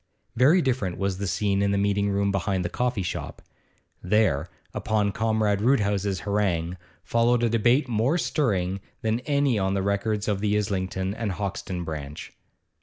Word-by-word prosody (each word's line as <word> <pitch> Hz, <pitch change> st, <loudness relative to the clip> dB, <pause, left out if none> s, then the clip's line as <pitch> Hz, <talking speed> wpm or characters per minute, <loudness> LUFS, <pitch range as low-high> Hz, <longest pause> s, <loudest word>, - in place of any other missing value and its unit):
Very 150 Hz, +9 st, +5 dB
different 120 Hz, -9 st, -1 dB
was 100 Hz, -1 st, -1 dB
the 100 Hz, -, -2 dB
scene 100 Hz, +2 st, 0 dB
in 100 Hz, -, +2 dB
the 100 Hz, -, +1 dB
meeting 100 Hz, 0 st, +1 dB
room 100 Hz, 0 st, +1 dB
behind 95 Hz, -1 st, -1 dB
the -, -, -1 dB
coffee 125 Hz, -3 st, -1 dB
shop. 90 Hz, -, -5 dB, 0.6 s
There, 90 Hz, -6 st, +2 dB, 0.2 s
upon 105 Hz, -2 st, 0 dB
Comrade 110 Hz, -1 st, +1 dB
Roodhouse's 105 Hz, -5 st, +1 dB
harangue, 95 Hz, -4 st, 0 dB, 0.3 s
followed 120 Hz, +1 st, +2 dB
a 120 Hz, -, +3 dB
debate 120 Hz, +5 st, +3 dB
more 120 Hz, +7 st, +1 dB
stirring 100 Hz, -, 0 dB, 0.2 s
than 110 Hz, +1 st, +1 dB
any 140 Hz, -6 st, +2 dB
on 95 Hz, 0 st, 0 dB
the 95 Hz, -, 0 dB
records 100 Hz, +1 st, -1 dB
of 100 Hz, -2 st, 0 dB
the 105 Hz, 0 st, +1 dB
Islington 95 Hz, -1 st, -2 dB
and 105 Hz, -3 st, -3 dB
Hoxton 95 Hz, -2 st, -4 dB
branch. 75 Hz, -3 st, -7 dB
100 Hz, 160 wpm, -25 LUFS, 95-110 Hz, 0.6 s, Very